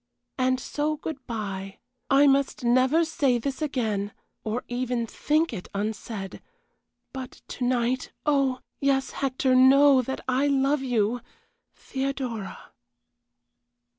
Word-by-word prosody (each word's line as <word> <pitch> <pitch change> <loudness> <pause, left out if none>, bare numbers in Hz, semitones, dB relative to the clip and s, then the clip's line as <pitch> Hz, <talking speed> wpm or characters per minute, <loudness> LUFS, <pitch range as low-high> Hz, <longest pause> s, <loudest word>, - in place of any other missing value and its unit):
"And 255 0 +2
so, 300 +3 -2
good 290 -4 -7
bye. 195 -4 -5 0.3
I 275 +1 +6
must 275 -2 +2
never 255 +7 +4
say 280 -6 +1
this 265 +5 -4
again 220 -9 -1 0.3
or 220 +3 -2
even 245 -1 -1
think 305 +6 0
it 185 -5 -6
unsaid; 205 -1 -4 0.7
but 260 -1 -8
to 255 - -5
night, 250 +1 0
oh! 275 -3 +2 0.2
Yes, 275 -1 +1
Hector, 260 -1 0
know 265 +1 +7
that 265 +2 -4
I 260 +2 +2
love 275 +1 +2
you! 240 -2 0 0.5
THEODORA." 265 -6 -4
255 Hz, 115 wpm, -26 LUFS, 235-275 Hz, 0.7 s, know